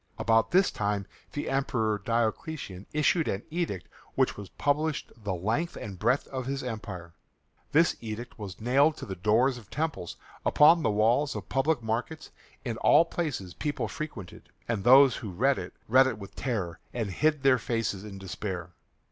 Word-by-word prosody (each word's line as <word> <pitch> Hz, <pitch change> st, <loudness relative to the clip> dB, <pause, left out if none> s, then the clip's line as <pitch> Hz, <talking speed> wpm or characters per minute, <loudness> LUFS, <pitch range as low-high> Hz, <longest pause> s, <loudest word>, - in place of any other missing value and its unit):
About 115 Hz, -1 st, +3 dB
this 190 Hz, +2 st, +4 dB
time 100 Hz, -1 st, -1 dB, 0.3 s
the 145 Hz, -, -3 dB
Emperor 115 Hz, -6 st, 0 dB
Diocletian 115 Hz, -, -2 dB
issued 150 Hz, +2 st, +2 dB
an 95 Hz, -, -2 dB
edict 160 Hz, -, -2 dB, 0.3 s
which -, -, +2 dB
was 100 Hz, -2 st, -9 dB
published 150 Hz, +1 st, -1 dB
the 105 Hz, -5 st, -4 dB
length 115 Hz, -, -1 dB
and 100 Hz, -4 st, -7 dB
breadth 130 Hz, +8 st, +2 dB
of 130 Hz, -2 st, -4 dB
his 135 Hz, 0 st, -2 dB
empire. 100 Hz, -8 st, -6 dB, 0.6 s
This 165 Hz, +3 st, +4 dB
edict 115 Hz, +1 st, -7 dB
was 95 Hz, -6 st, -7 dB
nailed 140 Hz, +7 st, +3 dB
to -, -, -7 dB
the 95 Hz, -, -5 dB
doors 115 Hz, +7 st, +2 dB
of 105 Hz, -4 st, -17 dB
temples, 155 Hz, -, -3 dB, 0.3 s
upon 165 Hz, +3 st, +6 dB
the -, -, +1 dB
walls 115 Hz, +7 st, +2 dB
of -, -, -6 dB
public 135 Hz, -1 st, +1 dB
markets, 120 Hz, +8 st, -3 dB, 0.3 s
in 115 Hz, -3 st, -2 dB
all 165 Hz, -, +5 dB
places 145 Hz, -, -3 dB
people 150 Hz, -1 st, -2 dB
frequented, 110 Hz, -, -7 dB, 0.2 s
and 110 Hz, -4 st, -1 dB
those 130 Hz, +2 st, +7 dB
who 110 Hz, -, -6 dB
read 130 Hz, +9 st, +2 dB
it -, -, -6 dB, 0.2 s
read 130 Hz, +3 st, +6 dB
it 130 Hz, -, -2 dB
with 100 Hz, -2 st, -10 dB
terror 95 Hz, -10 st, -3 dB, 0.2 s
and 110 Hz, -5 st, -2 dB
hid 150 Hz, -, +1 dB
their 130 Hz, -2 st, +5 dB
faces 115 Hz, -4 st, -2 dB
in 105 Hz, -2 st, -8 dB
despair. 95 Hz, -2 st, -5 dB
115 Hz, 170 wpm, -28 LUFS, 105-140 Hz, 0.6 s, those